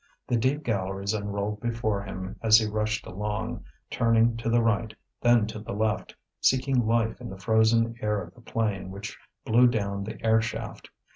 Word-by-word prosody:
The 125 - 0
deep 130 +6 +1
galleries 100 -2 -1
unrolled 105 0 -3
before 115 -4 -1
him 95 -1 -6
as 110 -1 +7
he 110 - +2
rushed 110 0 -1
along, 105 +4 -4 0.3
turning 115 0 +3
to 115 0 -2
the 120 0 +3
right, 110 0 0 0.3
then 120 -3 +5
to 110 0 -6
the 105 - -6
left, 110 +1 -1 0.2
seeking 130 -2 +2
life 115 0 +1
in 120 - -6
the 95 - -8
frozen 110 +3 +3
air 105 -1 0
of 85 -2 -8
the 120 - -18
plain 105 -5 -2
which 100 +2 -7 0.3
blew 120 +3 +5
down 100 -4 -1
the 110 +2 -6
air 110 0 +4
shaft. 115 -2 -6
110 Hz, 175 wpm, -27 LUFS, 105-115 Hz, 0.3 s, as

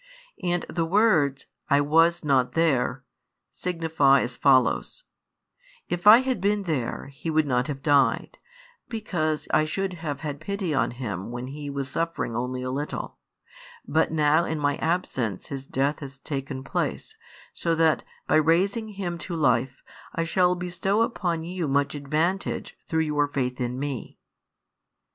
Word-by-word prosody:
And 175 -1 0
the 170 - -1
words: 165 -7 +2 0.2
I 140 -1 +5
was 165 +4 +3
not 130 -3 +2
there, 135 -4 +1 0.5
signify 160 -6 +2
as 125 +1 -2
follows: 135 - +2 0.9
"If 175 +3 -2
I 225 +4 +10
had 260 -7 -1
been 205 +1 +1
there, 140 -6 -3
he 150 +4 -5
would 155 -1 +2
not 125 -2 +1
have 135 -2 -5
died, 145 -2 +2 0.5
because 155 -10 -2
I 155 - +5
should 190 +4 -2
have 145 -4 -4
had 145 -3 -4
pity 195 -1 -2
on 135 - +2
him 110 -7 -5
when 120 +1 -5
he 145 +2 -6
was 140 -1 -3
suffering 165 -5 -2
only 125 +1 -2
a 130 - -3
little; 145 +3 -4 0.7
but 160 0 +2
now 155 +1 +3
in 160 -2 -2
My 145 -1 0
absence 130 - -2
his 135 -1 -6
death 140 +3 0
has 140 -1 -9
taken 135 -1 -5
place, 440 - -3 0.4
so 165 -1 0
that, 160 -1 +3 0.2
by - - +3
raising 185 +8 +2
him 190 -5 -5
|115 170 0 -4
life, 130 -3 +1 0.3
I 165 - 0
shall 180 +2 +2
bestow 185 +4 0
upon 175 -8 -1
you 175 -1 -3
much 140 0 +1
advantage 155 +6 -1
through 160 0 +1
your 150 -2 +1
faith 125 -3 -2
in 125 0 -2
Me." 140 -3 -5
155 Hz, 155 wpm, -25 LUFS, 135-175 Hz, 0.9 s, I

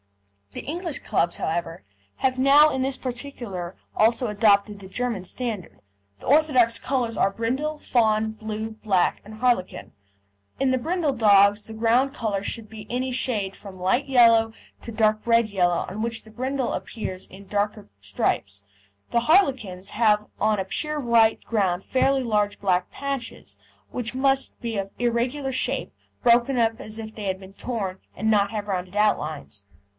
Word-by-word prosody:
The - - -7
English 335 0 -3
clubs, 175 -5 0
however, 165 -2 -3 0.3
have 260 -1 0
now 285 +3 +6
in 265 - -1
this 265 0 0
particular 235 -9 -6 0.2
also 230 +3 +3
adopted 205 -1 +3
the 190 - -11
German 235 -2 -2
standard. 220 -1 -5 0.4
The - - -13
orthodox 255 -6 +4
colours 245 -4 -1
are - - +3
brindle, 260 +9 -2
fawn, 220 -5 +1
blue, 220 0 -5
black, 210 -4 0
and 215 +1 -11
harlequin. 235 -5 -1 0.7
In 270 -1 +2
the 260 - +1
brindle 320 +1 0
dogs 205 -2 +5
the 220 - -9
ground 235 +5 +2
colour 205 -6 -2
should 220 +2 -4
be 215 -1 -10
any 255 +2 -2
shade 220 -6 -1
from 190 -3 -11
light 215 +10 +1
yellow 230 -4 +5 0.3
to 230 - -7
dark 215 -1 +2
red 230 -1 +3
yellow 175 -4 +1
on 205 +4 -5
which 230 0 -2
the 220 - -16
brindle 260 +2 -2
appears 190 -5 -5
in 195 +1 -13
darker 205 +1 -2
stripes. 100 0 -2 0.5
The 235 - +2
harlequins 240 - +2
have 210 -2 +3
on 215 0 +2
a 190 - -1
pure 300 +9 -3
white 230 -4 +3
ground 190 -5 0
fairly 270 +1 +2
large 210 -3 0
black 185 -2 0
patches, 275 -4 -5 0.4
which 245 0 -4
must 270 0 +1
be 230 -3 -3
of 195 0 -2
irregular 245 +4 0
shape, 255 - -2 0.3
broken 240 +2 +4
up 225 -1 +1
as 215 0 -4
if 220 -1 -7
they 210 - -6
had 190 -1 -2
been 190 0 -13
torn, 200 -6 -4 0.2
and 220 +3 0
not 200 -1 +3
have 210 -2 -4
rounded 185 -1 -3
outlines. 155 - -1
225 Hz, 160 wpm, -24 LUFS, 200-250 Hz, 0.7 s, now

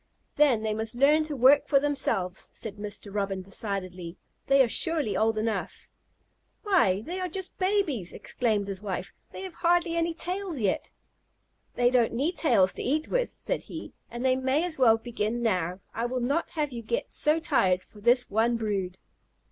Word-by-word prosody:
"Then 265 -7 +3
they 215 -1 0
must 220 +1 -4
learn 295 +5 +4
to 305 -1 -4
work 270 +3 +5
for 275 - +4
themselves," 195 -10 0
said 215 -3 -7
Mr. 205 -1 -6
Robin 195 -2 -2
decidedly. 185 -3 -3 0.3
"They 275 0 +6
are - - +1
surely 300 -1 0
old 220 0 +1
enough." 220 0 -3 0.8
"Why, 325 - +3
they 360 +3 -4
are 365 - -2
just 370 +2 -5
babies!" 370 - 0
exclaimed 215 -5 -1
his 195 -1 -5
wife. 195 -3 -5 0.2
"They - - -8
have 375 -2 -7
hardly 345 0 +1
any 335 0 0
tails 360 -2 -3
yet." 200 -4 -1 0.9
"They 245 0 +3
don't 245 -3 +2
need 290 +9 0
tails 210 - +3
to - - -6
eat 305 +5 -1
with," - - 0
said - - -3
he, - - -8 0.2
"and 240 +2 -5
they 255 0 +4
may 260 +4 +1
as 325 -5 -3
well 225 -3 +6
begin 230 0 -3
now. 180 -4 0
I 230 +2 -1
will 255 +1 -2
not 280 +7 0
have 300 -3 -2
you 235 -2 -6
get 235 +1 -3
so 305 +2 +3
tired 185 - +2
for 210 - -17
this 245 +3 +3
one 230 +3 +1
brood." 195 -5 -2
240 Hz, 180 wpm, -27 LUFS, 210-305 Hz, 0.9 s, They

